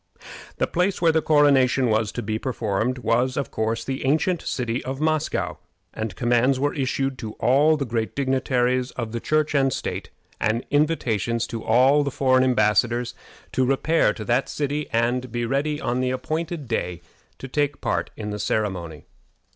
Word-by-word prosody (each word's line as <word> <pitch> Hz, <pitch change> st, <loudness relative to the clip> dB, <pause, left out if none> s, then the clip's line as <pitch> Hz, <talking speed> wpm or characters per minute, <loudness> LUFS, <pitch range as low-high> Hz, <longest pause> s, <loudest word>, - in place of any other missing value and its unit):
The -, -, +2 dB
place 180 Hz, +3 st, 0 dB
where 170 Hz, -2 st, +4 dB
the 160 Hz, 0 st, +2 dB
coronation 140 Hz, -4 st, +4 dB
was 110 Hz, -1 st, +1 dB
to -, -, -4 dB
be 110 Hz, +1 st, -2 dB
performed 115 Hz, -1 st, -1 dB
was, 125 Hz, +1 st, 0 dB
of 140 Hz, -, -2 dB
course, 110 Hz, +1 st, -1 dB
the 135 Hz, 0 st, -4 dB
ancient 160 Hz, +6 st, +1 dB
city 120 Hz, -1 st, -2 dB
of 135 Hz, +1 st, -4 dB
Moscow, 155 Hz, -, -1 dB, 0.4 s
and 110 Hz, -4 st, -4 dB
commands 120 Hz, +3 st, +2 dB
were 145 Hz, +1 st, +1 dB
issued 135 Hz, -1 st, -1 dB
to 110 Hz, -1 st, -6 dB
all 150 Hz, +7 st, +3 dB
the 140 Hz, -, -2 dB
great 115 Hz, -2 st, -2 dB
dignitaries 130 Hz, -2 st, +1 dB
of 115 Hz, -3 st, -5 dB
Church 155 Hz, 0 st, +1 dB
and 135 Hz, -2 st, +3 dB
state, -, -, -4 dB, 0.3 s
and 110 Hz, +3 st, 0 dB
invitations 120 Hz, -, +1 dB
to 115 Hz, -1 st, -6 dB
all 130 Hz, +6 st, +4 dB
the 140 Hz, -, -1 dB
foreign 130 Hz, -1 st, +3 dB
embassadors, 120 Hz, 0 st, +2 dB, 0.4 s
to 130 Hz, -, +1 dB
repair 135 Hz, +1 st, +2 dB
to 110 Hz, -, -7 dB
that 120 Hz, +4 st, +1 dB
city, 145 Hz, 0 st, -2 dB
and 120 Hz, +2 st, 0 dB
be 120 Hz, 0 st, -2 dB
ready 145 Hz, +4 st, -1 dB
on 125 Hz, -2 st, -1 dB
the 130 Hz, 0 st, 0 dB
appointed 155 Hz, +3 st, -3 dB
day 90 Hz, -4 st, -3 dB, 0.3 s
to 135 Hz, -, -8 dB
take 145 Hz, +2 st, -1 dB
part -, -, -1 dB
in 105 Hz, -1 st, -4 dB
the 105 Hz, -, -4 dB
ceremony. 90 Hz, -8 st, -2 dB
130 Hz, 170 wpm, -23 LUFS, 115-140 Hz, 0.4 s, where